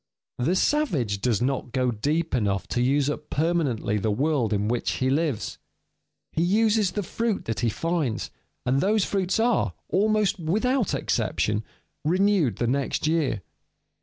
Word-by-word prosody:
_ - - +1
The 175 - +2
savage 155 - +1
does 120 -1 +1
not 130 -2 -2
go 125 -1 +1
deep 150 +9 -1
enough 100 -6 0
to 120 - 0
use 135 +2 +2
up 150 +1 -4
permanently 145 -10 0
the 110 - 0
world 130 +1 +1
in 105 0 0
which 120 +1 0
he 130 0 0
lives. 145 -5 -1 0.7
He 160 - -1
uses 210 +1 +2
the 205 - -2
fruits 225 +3 -2
that 115 -4 -2
he 115 - +1
finds, 160 -4 -2 0.3
and 130 +2 +2
those 210 0 +2
fruits 195 0 0
are, 225 - +1
almost 210 -1 +2
without 220 +8 +1
exception, 105 +1 0 0.4
renewed 180 - +2
the 120 - -1
next 135 +5 0
year. 155 - 0
150 Hz, 155 wpm, -25 LUFS, 120-190 Hz, 0.7 s, The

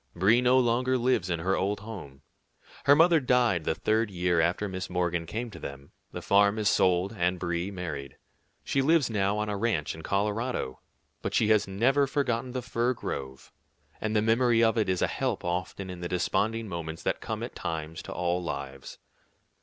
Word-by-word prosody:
Brie 105 +8 +4
no 125 +1 +4
longer 125 +1 +2
lives 120 -7 +1
in 85 -2 -1
her 95 +3 +1
old 100 +2 -1
home. 95 -12 -9 0.6
Her 140 - +7
mother 165 +1 +5
died 120 - +2
the 80 - 0
third 110 0 +1
year 90 -2 +1
after 90 +5 0
Miss 95 -1 -5
Morgan 85 -2 -1
came 115 +6 -4
to - - -10
them, 70 0 -8 0.2
the - - -7
farm 100 +1 +4
is 105 -1 +2
sold, 90 +2 +2
and 90 -1 +1
Brie 85 +1 -2
married. 80 -8 -6 0.5
She 135 - +1
lives 150 -2 +3
now 100 -1 +1
on 105 0 -1
a 105 - -2
ranch 100 -8 -1
in 80 - -9
Colorado, 105 - -2 0.4
but - - -3
she 105 - +3
has 110 -2 +4
never 130 +9 +2
forgotten 130 -3 -1
the 130 -1 -3
fir 120 +3 0
grove, 65 - -6 0.5
and 110 0 -1
the 105 - +3
memory 115 +1 +3
of 115 0 +3
it 110 -4 +1
is 90 -1 +1
a - - +3
help 130 -9 -2
often 90 +2 -3
in 90 - -8
the 85 0 -4
desponding 105 +5 0
moments 80 -3 -6
that - - -1
come - - -4
at - - -6
times 80 -1 -5
to - - -9
all 90 0 -1
lives. 70 -5 -6
100 Hz, 195 wpm, -28 LUFS, 85-115 Hz, 0.6 s, Her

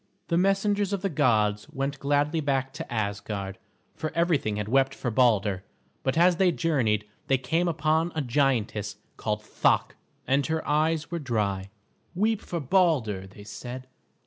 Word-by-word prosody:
The 170 - +2
messengers 195 +2 +2
of 195 -1 -2
the 195 - +1
gods 105 -8 +2
went 135 +1 -3
gladly 145 +3 +1
back 135 -2 -1
to - - -7
Asgard, 100 -2 -3 0.4
for 155 - -3
everything 165 -11 +1
had 105 0 -3
wept 135 +3 +2
for 125 - -3
Balder; 105 -5 +2 0.4
but 130 +3 -1
as 175 +1 +5
they 185 -1 +4
journeyed 120 -12 +1 0.2
they 135 - +3
came 160 +8 0
upon 160 +1 +1
a 155 - 0
giantess, 120 -6 0 0.2
called 105 0 -2
Thok, - - +1 0.3
and 135 +2 +2
her 160 0 -2
eyes 155 +2 +1
were 170 - -2
dry. 105 -8 -1 0.5
"Weep 215 +3 +1
for 170 - -4
Balder," 130 - +1
they 100 +2 -13
said. 125 +4 -7
135 Hz, 155 wpm, -27 LUFS, 105-165 Hz, 0.5 s, as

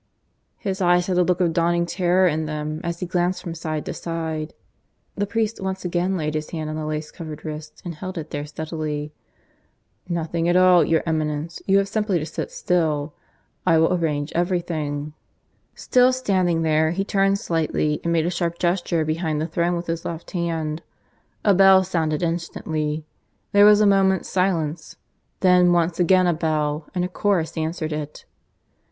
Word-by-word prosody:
His 195 -2 -3
eyes 175 0 +4
had 180 -1 +1
a - - +5
look 180 +1 +1
of 170 -2 +2
dawning 170 +1 +2
terror 180 +1 +2
in 160 -1 -1
them 155 +1 -4
as 170 0 -4
he - - -1
glanced 180 +1 -1
from 170 - -5
side 155 -2 -4
to - - -4
side. 160 -2 -4 0.6
The 205 0 -1
priest 225 0 -1
once 190 -1 -4
again 180 +2 0
laid 155 -2 -2
his 155 0 -3
hand 155 -2 -4
on - - -4
the 155 -1 -4
lace 155 0 -4
covered 155 -2 -8
wrist 150 0 -7
and 175 - -4
held 185 +4 -7
it 160 - -6
there 145 0 -4
steadily. 155 -1 -4 1.0
"Nothing 170 0 -1
at 175 - +2
all, 185 -1 +6
your 160 -1 +1
Eminence. 155 0 -2
You 195 0 +5
have 200 0 +2
simply 210 -2 0
to 155 - -3
sit 155 - -5
still. 155 -4 0 0.5
I 165 -3 +4
will 165 +3 +3
arrange 155 -4 -1
everything." 160 -4 -2 0.6
Still 250 0 +3
standing 185 -10 +1
there, 155 0 +2
he 185 +4 -1
turned 195 0 +2
slightly 155 -4 -1
and 170 - 0
made 165 -1 +2
a 175 - 0
sharp 170 -1 -2
gesture 175 -2 0
behind 155 -1 -1
the 155 - -1
throne 170 +1 0
with 170 0 -4
his 165 0 -3
left 165 0 -6
hand. 165 -3 -2 0.6
A 205 - +6
bell 190 0 +6
sounded 165 -4 -1
instantly. 160 -2 -2 0.5
There 205 0 +6
was 210 0 +7
a - - +5
moment's 195 -2 +3
silence. 170 -4 -1 0.5
Then 180 -1 +5
once 170 0 +1
again 185 +1 +4
a 175 - +3
bell; 155 -2 -1
and 180 0 +1
a - - -1
chorus 185 -3 0
answered 160 0 -2
it. 150 0 -6
170 Hz, 180 wpm, -23 LUFS, 155-180 Hz, 1.0 s, was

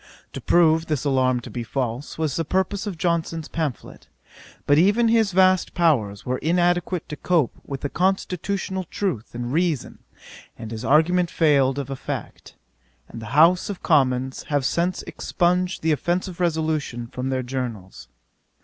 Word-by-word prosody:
To - - -6
prove 165 -1 +3
this 150 -3 -2
alarm 130 -3 +2
to - - -10
be 120 - -4
false, 125 +3 -4
was 155 -4 -1
the 165 - 0
purpose 190 +5 -1
of 190 -5 -4
Johnson's 165 -2 -1
pamphlet; 155 -8 -5 0.6
but 145 +1 +4
even 210 +6 +4
his 225 -3 +3
vast 185 0 +3
powers 120 - +1
were 125 +1 -2
inadequate 175 +1 0
to 150 - -4
cope 160 -5 +1
with 140 0 -6
constitutional 190 0 -1
truth 155 - -4
and 120 +1 -4
reason, 165 -4 -1 0.6
and 110 -1 -8
his 115 0 -6
argument 170 +6 +3
failed 140 -5 +2
of 140 -1 -4
effect; 135 - -6 0.5
and 115 - -9
the 110 - -8
House 175 +5 +5
of 200 - -6
Commons 130 -4 +1
have 145 -3 0
since 175 +5 0
expunged 180 0 -1
the 160 - +2
offensive 175 +4 -1
resolution 155 -8 -1
from 125 +2 -5
their 130 -1 -1
Journals. 120 -7 -6
160 Hz, 150 wpm, -23 LUFS, 130-180 Hz, 0.6 s, House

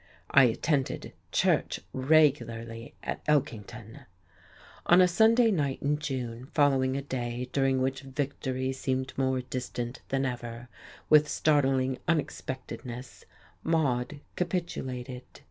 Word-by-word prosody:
I 135 -2 +7
attended 135 +4 -1 0.2
church - - +2
regularly 130 -5 +1
at - - -4
Elkington.... 115 -5 -2 0.8
On 175 - +7
a 180 - +7
Sunday 225 +5 +5
night 145 -8 0
in 145 +1 +1
June, 125 -4 -4
following 135 -3 +3
a 140 - -3
day 125 -2 -4
during 135 -1 +2
which 135 +1 -1
victory 135 -1 -3
seemed 130 0 -2
more 130 -1 +1
distant 125 -1 -5
than 135 0 0
ever, 120 -1 -5 0.4
with 150 0 +6
startling 135 -4 +2
unexpectedness 130 -5 -4 0.4
Maude 145 -3 0
capitulated. 135 -9 -3
130 Hz, 110 wpm, -29 LUFS, 125-145 Hz, 0.8 s, I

